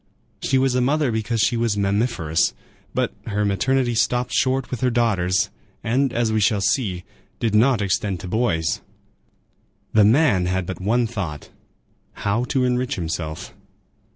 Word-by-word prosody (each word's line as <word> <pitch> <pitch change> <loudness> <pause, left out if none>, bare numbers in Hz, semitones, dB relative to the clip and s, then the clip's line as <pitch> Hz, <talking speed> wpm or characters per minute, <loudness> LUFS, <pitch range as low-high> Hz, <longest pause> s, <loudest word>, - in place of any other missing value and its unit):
She 135 - +1
was 130 -1 +2
a 125 - +2
mother 140 +1 +1
because 110 0 -1
she 120 - +2
was 115 -3 0
mammiferous. 100 -5 0 0.4
But - - -1
her 105 -1 0
maternity 120 +5 +1
stopped 125 +2 0
short 130 -1 +1
with 125 - -4
her 130 - +3
daughters, 95 -7 +1 0.3
and, 130 +3 +1
as 115 -2 0
we 110 - +2
shall 105 0 +2
see, 100 -3 0 0.4
did 115 -3 0
not 115 0 +3
extend 95 -1 -1
to - - -7
boys. 90 -6 0 1.1
The 110 - +6
man 110 - +4
had 95 0 -1
but 95 +1 -6
one 115 +5 +2
thought,—how 100 - -6
to 130 +1 0
enrich 125 +2 0
himself. 80 -1 -4
110 Hz, 150 wpm, -22 LUFS, 95-125 Hz, 1.1 s, The